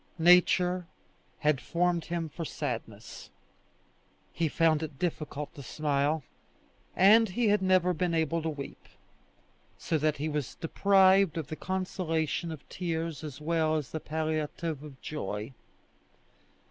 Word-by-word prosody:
Nature 180 +1 +4 0.5
had 150 -3 +2
formed 175 -1 0
him 170 -1 -2
for 160 +2 -6
sadness. - - -6 1.0
He 165 - 0
found 160 0 +2
it 155 -3 -6
difficult 155 -3 -3
to 140 - -10
smile, 145 +2 0 0.7
and 215 +4 +6
he 220 +4 +1
had 205 -1 +3
never 185 -1 +3
been 170 0 0
able 165 +1 +1
to 160 - -2
weep, 145 -3 -8 0.9
so 160 - -1
that 150 0 +1
he 150 +3 -2
was 150 -4 -3
deprived 190 0 +4
of 155 -3 -4
the 155 - -4
consolation 170 -3 -2
of 155 -3 -9
tears 165 -3 -3
as 150 -3 -7
well 160 0 +1
as 150 -4 -2
of - - -22
the 160 - -3
palliative 155 0 -3
of 145 -3 -11
joy. 110 -4 -4
160 Hz, 135 wpm, -29 LUFS, 150-180 Hz, 1.0 s, and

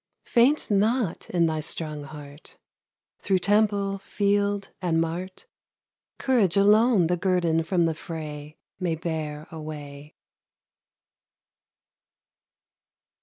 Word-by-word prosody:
Faint 245 +2 +3
not 210 -1 +1
in 170 -2 +2
thy 160 -1 0
strong 155 -1 -4
heart! 145 0 -12 0.6
Through 195 -2 +1
temple, 200 0 +1
field 200 0 0
and 170 -3 +1
mart, 175 - -4 0.7
Courage 220 -9 +2
alone 210 0 +5
the 175 +2 +1
guerdon 175 -3 +1
from 170 +1 +1
the 165 - +1
fray 155 -2 -7 0.2
May 175 -3 0
bear 155 -2 -4
away. 150 -2 -9
175 Hz, 95 wpm, -25 LUFS, 155-200 Hz, 0.7 s, alone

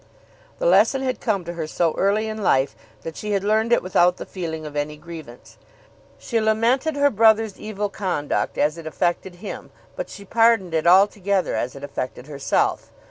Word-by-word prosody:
The - - -3
lesson 270 - +4
had 255 -1 -2
come 200 -6 -1
to 170 - -5
her 165 -2 -4
so 165 0 0
early 210 +3 +1
in 215 0 -5
life 135 -8 +2 0.3
that 165 -1 -6
she 210 -1 -3
had 195 -1 0
learned 220 +3 +1
it 240 - +4
without 180 -1 +3
the - - -7
feeling 160 -4 -5
of 150 -1 -8
any 150 +1 -2
grievance. 160 -7 -11 0.6
She 230 -2 -1
lamented 235 +8 +1
her 285 0 +3
brother's 220 -2 +3
evil 210 -1 -3
conduct 185 -7 -2
as 150 +3 +1
it 160 - -8
affected 175 +2 -1
him, 190 +4 -8 0.3
but - - -5
she 200 - -10
pardoned 225 -5 +3
it 160 +1 +1
altogether 195 +1 +3
as 120 +4 -2
it 140 - -10
affected 130 -3 -5
herself. 140 -2 -1
190 Hz, 185 wpm, -22 LUFS, 160-220 Hz, 0.6 s, lesson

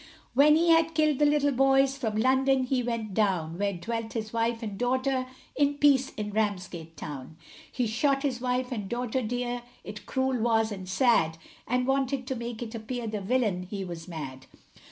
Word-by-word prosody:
When 290 +4 +6
he 335 +2 +3
had 325 0 +4
killed 305 -3 +2
the 295 - +5
little 290 -1 +3
boys, 270 +1 +3
from 225 -6 -3
London 260 +3 +3
he 255 0 0
went 230 -4 -3
down, 180 -5 0
Where 200 0 +1
dwelt 225 +5 -4
his 220 -1 -4
wife 230 0 0
and 210 -3 -4
daughter, 255 +3 0 0.3
in 285 0 +2
peace, 280 -2 +4
in 210 -1 -4
Ramsgate 185 -6 -3
town. 145 +1 -7 0.3
He 250 - -1
shot 275 +5 +1
his 255 -4 -1
wife 250 0 -1
and 210 -5 -4
daughter 245 +1 -1
dear, 245 +1 -2 0.2
it 210 0 -9
cruel 260 -1 0
was, 225 -1 +2
and 190 -3 -6
sad, 190 -8 +3 0.3
And 250 +1 +1
wanted 270 0 0
to 260 - -3
make 235 -1 -5
it 225 -1 -8
appear 230 +2 -4
the 215 -2 -3
villian, 210 -3 +1
he 195 -2 -4
was 170 -2 -7
mad. 140 -6 -7
240 Hz, 185 wpm, -28 LUFS, 210-265 Hz, 0.3 s, When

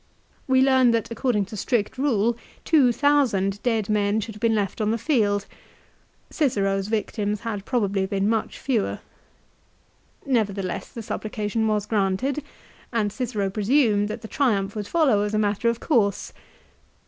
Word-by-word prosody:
We 260 0 +4
learn 260 -2 +5
that 230 0 -1
according 230 -3 0
to 205 - -9
strict 210 +1 -1
rule 240 -4 +1 0.3
two 285 -7 +4
thousand 235 -9 +2
dead 225 -4 0
men 210 0 +1
should 220 +1 -5
have 210 - -12
been 230 -1 +2
left 205 0 -2
on 210 - +1
the 225 - +1
field. 205 -7 +1 0.9
Cicero's 195 -9 0
victims 210 -1 -2
had 210 -4 -4
probably 200 -6 0
been 200 0 0
much 220 0 -1
fewer. 240 -7 -1 1.3
Never 225 -7 +1
theless 190 -3 -5
the 230 - -7
supplication 215 +1 -2
was 210 -2 0
granted, 215 +7 0 0.5
and 215 -4 0
Cicero 215 -6 -2
presumed 210 -1 +2
that 215 +2 -6
the - - -6
Triumph 215 -8 0
would 210 -2 -4
follow 280 -11 +3
as 210 +1 -1
a - - +2
matter 210 +2 +1
of 230 0 -2
course. 210 - 0
215 Hz, 155 wpm, -24 LUFS, 205-240 Hz, 1.3 s, learn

